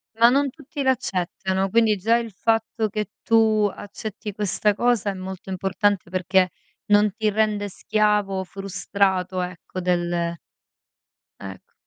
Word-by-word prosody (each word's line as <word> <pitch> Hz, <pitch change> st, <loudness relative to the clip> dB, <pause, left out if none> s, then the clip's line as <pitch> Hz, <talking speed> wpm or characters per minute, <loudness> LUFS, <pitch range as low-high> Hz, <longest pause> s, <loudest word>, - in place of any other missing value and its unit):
Ma 230 Hz, +1 st, +6 dB
non 275 Hz, +2 st, +2 dB
tutti 290 Hz, 0 st, -6 dB
l'accettano, 190 Hz, -6 st, 0 dB
quindi 225 Hz, 0 st, +4 dB
già 225 Hz, +5 st, +3 dB
il 230 Hz, -1 st, -4 dB
fatto 225 Hz, +2 st, 0 dB
che 210 Hz, 0 st, -3 dB
tu 220 Hz, -2 st, +4 dB
accetti 210 Hz, +1 st, -7 dB
questa 205 Hz, +1 st, 0 dB
cosa 240 Hz, -4 st, +1 dB
è 195 Hz, -, -2 dB
molto 190 Hz, 0 st, -7 dB
importante 190 Hz, 0 st, 0 dB
perché 185 Hz, 0 st, +2 dB, 0.4 s
non 205 Hz, 0 st, +5 dB
ti 220 Hz, -2 st, +1 dB
rende 210 Hz, -1 st, +1 dB
schiavo, 205 Hz, -1 st, 0 dB
frustrato, 190 Hz, -1 st, -1 dB
ecco 180 Hz, +1 st, -6 dB
del 175 Hz, -1 st, 0 dB, 1.2 s
ecc -, -, -10 dB
205 Hz, 125 wpm, -23 LUFS, 190-220 Hz, 1.2 s, Ma